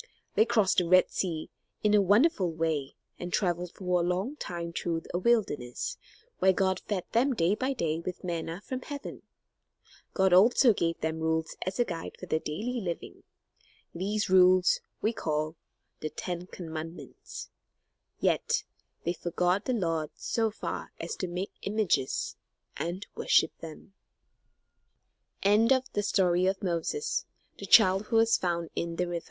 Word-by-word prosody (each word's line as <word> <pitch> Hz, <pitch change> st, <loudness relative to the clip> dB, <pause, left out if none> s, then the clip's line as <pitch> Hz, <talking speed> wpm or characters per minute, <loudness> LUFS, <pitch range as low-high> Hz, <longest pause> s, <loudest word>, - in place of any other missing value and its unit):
They 220 Hz, -, +4 dB
crossed 220 Hz, -6 st, +3 dB
the 175 Hz, -, 0 dB
Red 185 Hz, +1 st, +5 dB
Sea 165 Hz, -4 st, -2 dB, 0.3 s
in 210 Hz, -1 st, +3 dB
a 210 Hz, -, +6 dB
wonderful 205 Hz, -, +3 dB
way, 160 Hz, -4 st, -2 dB, 0.2 s
and 175 Hz, 0 st, -5 dB
traveled 175 Hz, -2 st, 0 dB
for 180 Hz, -2 st, 0 dB
a -, -, +1 dB
long 185 Hz, -, -1 dB
time 170 Hz, -, -5 dB
through 165 Hz, -1 st, -2 dB
a 175 Hz, -, +1 dB
wilderness, 185 Hz, -, 0 dB, 0.4 s
where 190 Hz, 0 st, +5 dB
God 190 Hz, 0 st, +1 dB
fed 195 Hz, -4 st, -3 dB
them 255 Hz, +3 st, +2 dB
day 170 Hz, 0 st, +2 dB
by 260 Hz, +5 st, -1 dB
day 165 Hz, -9 st, -1 dB
with 180 Hz, +2 st, -6 dB
manna 170 Hz, 0 st, -3 dB
from 255 Hz, 0 st, -4 dB
heaven. 285 Hz, +1 st, -7 dB, 0.9 s
God 190 Hz, -2 st, +3 dB
also 230 Hz, +5 st, +6 dB
gave 165 Hz, -3 st, -1 dB
them 160 Hz, 0 st, -1 dB
rules 160 Hz, 0 st, -1 dB
as 185 Hz, -, -2 dB
a 240 Hz, -, +3 dB
guide 170 Hz, -5 st, -6 dB
for -, -, -7 dB
their 160 Hz, -2 st, 0 dB
daily 225 Hz, +12 st, -3 dB
living; 175 Hz, -4 st, -5 dB, 0.7 s
these 205 Hz, +5 st, -1 dB
rules 185 Hz, -1 st, +5 dB, 0.2 s
we 220 Hz, -, +2 dB
call 155 Hz, -3 st, -2 dB, 0.4 s
the 155 Hz, -, -3 dB
Ten 175 Hz, +2 st, -5 dB
Commandments; 165 Hz, -2 st, -8 dB, 0.7 s
yet -, -, +1 dB, 0.4 s
they 170 Hz, -, 0 dB
forgot 180 Hz, +3 st, 0 dB
the 255 Hz, -, 0 dB
Lord 165 Hz, -8 st, -1 dB
so 225 Hz, -1 st, 0 dB
far 215 Hz, -, -5 dB
as 445 Hz, -, -4 dB
to 185 Hz, -, -2 dB
make 180 Hz, +3 st, -4 dB
images 200 Hz, -10 st, 0 dB, 0.4 s
and 180 Hz, +4 st, -4 dB
worship 160 Hz, -, +3 dB
180 Hz, 125 wpm, -29 LUFS, 165-210 Hz, 0.9 s, a